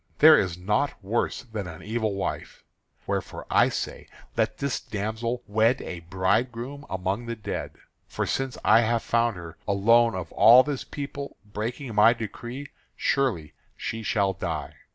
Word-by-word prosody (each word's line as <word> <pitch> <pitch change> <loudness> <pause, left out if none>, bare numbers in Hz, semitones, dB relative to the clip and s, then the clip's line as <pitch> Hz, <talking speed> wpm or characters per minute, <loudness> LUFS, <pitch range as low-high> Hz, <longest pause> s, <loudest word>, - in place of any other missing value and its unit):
There 155 +1 +9
is 90 - 0
naught 105 +10 0
worse 115 +7 -1
than 110 -6 -5
an 80 -2 -9
evil 110 -2 -1
wife. 95 - -4 0.4
Wherefore - - -3
I - - +5
say - - -5 0.3
let - - 0
this 140 -2 -1
damsel 110 +4 -3
wed 110 +5 +2
a 90 - -6
bridegroom 115 - -1
among 95 +5 -2
the 115 - -3
dead. 105 - -5 0.3
For - - -2
since 135 -1 -2
I 110 +2 +7
have 115 0 +1
found 115 -1 +1
her, 85 -1 -10
alone 115 +3 +4
of 90 -3 -5
all 125 +3 +8
this 145 -2 -3
people, 140 -1 -6
breaking 115 +5 -5
my 105 +2 +6
decree, 120 +4 -7 0.3
surely 125 - 0 0.2
she 115 - -4
shall 100 -2 +1
die. 95 - -4
115 Hz, 155 wpm, -26 LUFS, 100-125 Hz, 0.4 s, There